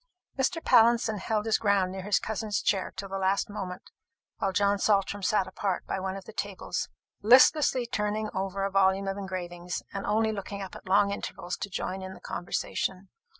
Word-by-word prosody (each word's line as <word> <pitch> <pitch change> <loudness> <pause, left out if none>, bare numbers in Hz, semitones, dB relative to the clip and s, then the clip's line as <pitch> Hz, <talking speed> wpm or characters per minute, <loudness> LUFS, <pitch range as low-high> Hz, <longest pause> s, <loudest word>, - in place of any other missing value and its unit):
Mr. 275 +5 -1
Pallinson 230 -2 +5
held 210 +2 -1
his 220 -1 +2
ground 200 -3 +2
near 190 0 -5
his 205 +2 +2
cousin's 215 -2 -2
chair 195 -2 +1
till 195 +1 -5
the 195 0 -4
last 195 +2 +1
moment, 185 -3 -6 0.5
while 195 - 0
John 200 +1 +2
Saltram 200 0 +2
sat 195 0 +2
apart 185 0 -2
by - - -2
one 190 0 -3
of 195 - -10
the 220 - -11
tables, 200 -3 -3 0.3
listlessly 255 +3 +6
turning 215 -1 -1
over 195 +1 -2
a 195 - -1
volume 195 0 +3
of 195 0 -2
engravings, 180 -2 -5
and 195 0 -4
only 220 +1 +2
looking 200 -1 -5
up 190 - -8
at - - -11
long 200 +1 +4
intervals 180 -2 -4
to 200 - -5
join 190 0 -3
in 190 0 -7
the - - -13
conversation. 185 +2 -3
200 Hz, 190 wpm, -28 LUFS, 190-210 Hz, 0.5 s, listlessly